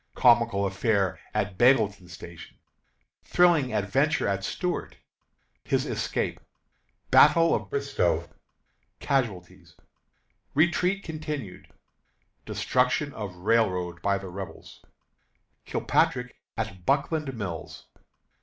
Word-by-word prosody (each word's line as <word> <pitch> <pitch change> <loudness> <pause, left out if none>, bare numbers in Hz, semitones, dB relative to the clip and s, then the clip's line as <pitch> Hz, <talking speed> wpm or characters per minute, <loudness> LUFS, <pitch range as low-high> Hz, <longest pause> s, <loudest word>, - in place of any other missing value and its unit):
Comical 115 -5 +4
Affair 100 -1 0
at 95 -1 -2
Bealeton 110 -7 +3
Station. 85 0 -11 0.7
Thrilling 170 -7 +3
Adventure 130 +9 +1
of 100 -1 -1
Stuart. 180 - -3 0.7
His - - 0
Escape. - - -2 0.7
Battle 165 0 +6
of - - -2
Bristoe. 425 -1 0 0.7
Casualties. 90 - -2 0.8
Retreat 180 +5 +2
Continued. 150 - -6 0.8
Destruction 130 +3 0
of 100 -5 -6
Railroad 90 -3 0
by 100 0 +1
the 95 -1 -8
Rebels. 90 -3 -9 0.8
Kilpatrick 125 -1 0 0.2
at 95 -4 -4
Buckland 145 - 0
Mills. 90 -7 -6
110 Hz, 90 wpm, -27 LUFS, 95-145 Hz, 0.8 s, Battle